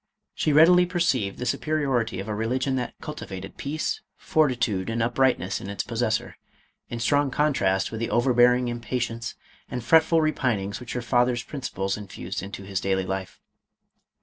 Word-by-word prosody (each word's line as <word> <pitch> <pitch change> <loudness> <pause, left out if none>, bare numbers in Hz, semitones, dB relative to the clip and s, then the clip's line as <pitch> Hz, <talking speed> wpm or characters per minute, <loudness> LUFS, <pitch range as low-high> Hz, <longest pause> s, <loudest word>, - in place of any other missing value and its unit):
She 155 - 0
readily 175 +4 +6
perceived 150 - 0
the 125 - -4
superiority 130 -9 0
of 100 - -5
a 105 - -2
religion 130 +5 0
that 125 - -3
cultivated 95 -11 -7
peace, 150 +3 -3 0.2
fortitude, 120 -11 +1
and 115 +1 -2
uprightness 120 -4 +1
in 95 - -7
its 100 - -3
pos - - -5
sessor, - - 0 0.6
in 120 - -4
strong 145 +5 +2
contrast 110 -10 +1
with 110 - -5
the 115 - -2
overbearing 125 0 +4
impa 120 0 -4
tience, 115 -1 -3 0.3
and 125 -1 -4
fretful 160 +6 +5
repinings 115 -10 0
which 125 -2 -7
her 125 - -3
father's 120 0 +2
princi 135 -3 -6
ples 95 +1 -1
infused 95 -2 -6
into 100 0 -7
his 95 -1 -3
daily 95 -1 0
life. 95 0 -4
120 Hz, 165 wpm, -25 LUFS, 100-135 Hz, 0.6 s, readily